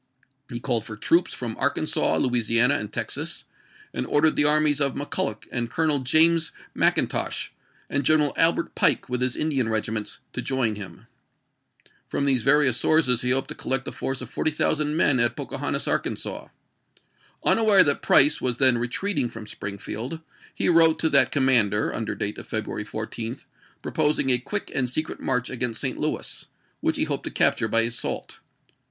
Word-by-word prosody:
He 120 - -5
called 115 -1 0
for 105 -2 -9
troops 170 +10 +1
from 115 -3 -5
Arkansas, 145 +3 0
Louisiana, 120 +1 +3
and 105 0 -7
Texas, - - -3 0.5
and - - -4
ordered 155 +1 +2
the 145 - +3
armies 150 -1 +3
of 140 -2 +1
McCulloch 125 -6 -3
and 120 -1 -2
Colonel 155 0 +1
James 160 +5 +4 0.2
Mcin - - +2
tosh, - - -3 0.4
and 145 - -2
General 150 +1 +2
Albert 165 0 +1
Pike - - +1
with 125 0 -2
his 125 -1 +1
Indian 135 -7 -1
regi 110 -1 -2
ments, 105 -1 -4
to - - -4
join 130 -5 -1
him. 100 0 -9 1.0
From 140 - -2
these 130 -3 +1
various 135 -2 +3
sources 130 -4 +2
he 125 - -1
hoped 130 +1 +1
to - - -3
collect 135 0 -3
a - - -3
force 135 -1 -4
of 125 - -8
40,000 155 0 0
men 135 -5 +3
at 120 0 +2
Pocahontas, - - -3
Arkansas. - - -3 1.0
Unaware 215 -4 +5
that 145 -1 -1
Price 145 +2 +5
was 125 -2 0
then 130 -3 +5
retreating 130 +3 -1
from 115 -2 -10
Springfield, 105 +8 -6 0.4
he - - -1
wrote 165 -2 +5
to 160 - +1
that 140 -2 +5
commander, 120 -7 +2
under 110 -1 -4
date 105 -1 -4
of - - -12
February 110 -1 -3
14, 115 +3 -5 0.5
proposing 150 -3 0
a 125 - +3
quick 205 - -4
and 125 -2 0
secret 155 +5 -3
march 125 -1 -2
against 125 -3 -1
St. - - -2
Louis, - - -3 0.3
which - - -1
he - - +1
hoped - - -3
to - - -3
capture 110 - +1
by 115 +1 +3
assault. 115 +1 -3
130 Hz, 170 wpm, -24 LUFS, 115-150 Hz, 1.0 s, Unaware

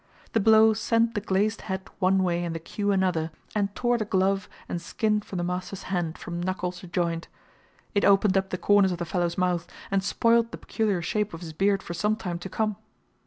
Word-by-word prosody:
The 225 - +3
blow 220 +1 +6
sent 230 +1 +1
the 205 - -2
glazed 210 +2 0
hat 190 0 -3
one 190 0 +3
way 175 -1 0
and 170 -1 -3
the - - -3
cue 205 +5 -2
another, 180 -5 +1 0.2
and 200 -1 -1
tore 240 -1 +1
the 215 - -1
glove 195 -1 +1 0.2
and 175 - -3
skin 210 +3 0
from 195 - -7
the 175 - -1
master's 185 +2 -4
hand 170 -3 -1
from 170 0 -5
knuckle 180 0 -2
to 180 0 -11
joint. 170 -1 -1 0.7
It 200 - +2
opened 195 -1 +5
up 190 0 +1
the 185 - -2
corners 200 +1 +4
of 175 - -2
the 175 - -3
fellow's 170 0 -1
mouth, 180 -2 0 0.2
and 195 -1 +2
spoilt 230 +3 +3
the - - -6
peculiar 205 -6 -1
shape 210 +1 -1
of 165 - -10
his 160 -2 -7
beard 195 +3 +1
for 175 - -6
some 210 +6 +1
time 175 -5 -4
to 190 - -7
come. 215 -1 -1
190 Hz, 215 wpm, -26 LUFS, 175-210 Hz, 0.7 s, blow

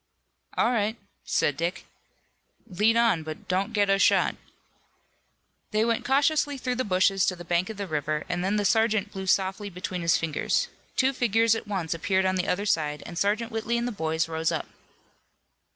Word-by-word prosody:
"All 235 - +3
right," 220 -1 0 0.3
said 145 - +1
Dick. 170 +4 -3 0.8
"Lead 220 +2 +2
on, 230 -8 +3
but 155 0 -8
don't 190 +4 0
get 205 -2 +2
us 195 0 +3
shot." - - +3 1.3
They 215 +1 +1
went 230 -1 0
cautiously 285 +1 +2
through 250 -1 -2
the 255 - 0
bushes 190 -1 +2
to 185 - +1
the 175 0 -10
bank 175 +3 0
of 220 - -7
the 200 - -3
river, 150 -2 -2
and 180 0 -2
then 195 +3 0
the 205 -1 0
sergeant 220 -2 +2
blew 190 0 -6
softly 195 +2 +1
between 180 0 -5
his 170 -1 +3
fingers. 160 -3 -1 0.3
Two 265 +1 +2
figures 230 -2 +3
at 225 -1 -4
once 185 -6 -2
appeared 190 +3 0
on 185 - +2
the 185 0 -1
other 200 +3 0
side, 150 -6 0
and 175 - -8
Sergeant 215 +6 0
Whitley 225 +1 -1
and 235 +1 -1
the - - -2
boys 160 -5 -1
rose 160 0 -1
up. - - -2
195 Hz, 185 wpm, -26 LUFS, 175-225 Hz, 1.3 s, All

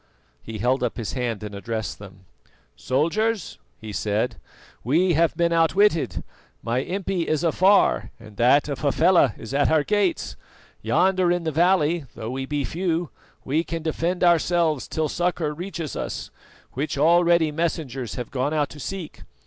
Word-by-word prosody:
He 110 -1 -7
held 125 +5 +1
up - - -2
his 115 -4 -4
hand 120 -5 -3
and 105 -1 -6
addressed 110 +2 -4
them. 95 -2 -13 0.5
"Soldiers," 170 - -1 0.2
he 110 - -8
said, 105 +5 -1 0.5
"we 170 +9 +2
have 165 +1 +2
been 170 -1 +2
outwitted. 170 +2 +2 0.4
My 115 +2 0
impi 185 +1 -2
is 155 +1 0
afar, 185 +5 +3
and 110 -2 -14
that 130 +5 +4
of 140 -2 -4
Hafela 155 - +3
is 115 - -8
at 145 +1 +2
our 155 -2 +3
gates. 200 - 0 0.5
Yonder 180 - +2
in 175 -1 0
the 160 - -1
valley, 170 -1 +2
though 110 +2 -5
we 135 +1 -4
be 145 -1 -1
few, 170 +1 -2 0.3
we 155 +5 +1
can 165 -1 -5
defend 170 +3 -1
ourselves 170 -3 +2
till 155 -1 -1
succour 170 -1 -1
reaches 165 -2 -5
us, - - -5 0.4
which 145 +2 -3
already 170 +1 +4
messengers 145 - -3
have 125 - -6
gone 140 +4 -1
out 145 -2 +1
to 150 - -11
seek. 185 +2 -6
155 Hz, 155 wpm, -24 LUFS, 130-175 Hz, 0.5 s, that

